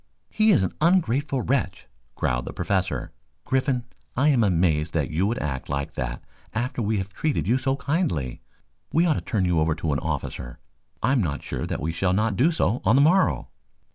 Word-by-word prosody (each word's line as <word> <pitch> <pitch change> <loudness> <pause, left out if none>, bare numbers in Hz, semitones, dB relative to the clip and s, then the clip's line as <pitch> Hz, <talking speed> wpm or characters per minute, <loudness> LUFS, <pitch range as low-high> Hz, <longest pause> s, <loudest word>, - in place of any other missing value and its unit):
"He 220 0 +3
is 175 - +5
an 95 - -2
ungrateful 145 -6 +2
wretch," 110 -7 -1 0.3
growled 60 0 -1
the - - -6
Professor. 95 -2 -1 0.3
"Griffin, 130 -1 +1 0.3
I 140 +4 +4
am 130 -6 +4
amazed 85 -5 +2
that 80 0 0
you 90 +6 +1
should 115 - -1
act 65 -4 -4
like 70 0 -2
that 60 -1 -4 0.3
after 125 +2 -1
we 110 0 0
have 95 0 -3
treated 150 -6 -1
you 125 +4 +3
so 135 0 0
kindly. 140 - -1 0.5
We 165 +2 +3
ought 165 - +4
to - - -3
turn 105 -7 0
you 90 -2 +2
over 80 0 +2
to 80 -2 -1
an 70 - 0
officer. - - -4 0.5
I 120 - +3
am 135 -3 +3
not 75 -7 -2
sure - - -4
that - - -3
we 80 - -1
shall 90 +2 0
not 105 +1 +1
do 135 - +4
so 125 - 0
on 110 - +4
the 140 - +6
morrow." 185 +5 +3
110 Hz, 200 wpm, -25 LUFS, 80-135 Hz, 0.5 s, the